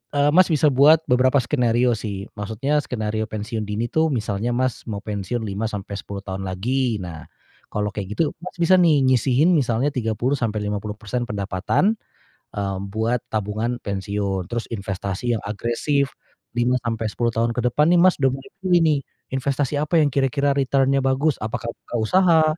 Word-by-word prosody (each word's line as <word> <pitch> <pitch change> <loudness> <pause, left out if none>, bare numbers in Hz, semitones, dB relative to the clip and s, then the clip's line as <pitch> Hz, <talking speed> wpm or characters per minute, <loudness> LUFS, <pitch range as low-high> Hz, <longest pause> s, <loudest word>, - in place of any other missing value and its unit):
eee, 145 0 +4
Mas, 185 +1 +7
bisa 150 0 +4
buat 150 +5 +6
beberapa 130 +2 +4
skenario 120 -1 +2
sih 100 -2 -5
maksudnya 115 +8 -1
skenario 110 -3 -2
pensiun 110 +1 -4
dini 110 +3 -2
itu 160 0 +3
misalnya, 110 -1 -1
Mas, 130 -1 -1
mau 105 -3 -4
pensiun 105 +2 -3
5 100 +2 -3
sampai 100 -2 -5
10 100 +1 -7
tahun 95 0 -4
lagi. 120 +5 0
Nah, 85 -3 -7 0.5
kalau 105 0 0
kayak 100 -1 -4
gitu, 155 -3 +2
Mas, 185 - -6
bisa 170 +2 +5
nih 160 -5 +4
nyisihin 130 +4 +3
misalnya 130 -1 +1
30 125 +1 -1
sampai 110 -4 -1
50% 105 +3 -3
pendapatan, 100 - 0 0.6
eee, 100 -2 -2
buat 115 +3 0
tabungan 110 +3 -1
pensiun. 100 -1 -2
Terus 120 -1 -2
investasi 100 +2 -2
yang - - -15
agresif 120 +6 0 0.4
5 120 +1 +2
sampai 115 -1 -1
10 120 +2 0
tahun 115 +1 +1
ke 125 - 0
depan 150 +5 +3
nih, - - +5
Mas, 185 -1 +5
udah 135 - +5
mulai 135 0 -12
pilih 180 -2 +3
nih 150 -3 +3 0.3
investasi 135 +1 0
apa 155 +2 +2
yang 145 - +2
kira-kira 140 +1 +1
return-nya 135 0 +2
bagus 135 +2 +2
apakah 115 +2 -4
buka - - -10
usaha 165 - +4
120 Hz, 165 wpm, -22 LUFS, 105-140 Hz, 0.6 s, Mas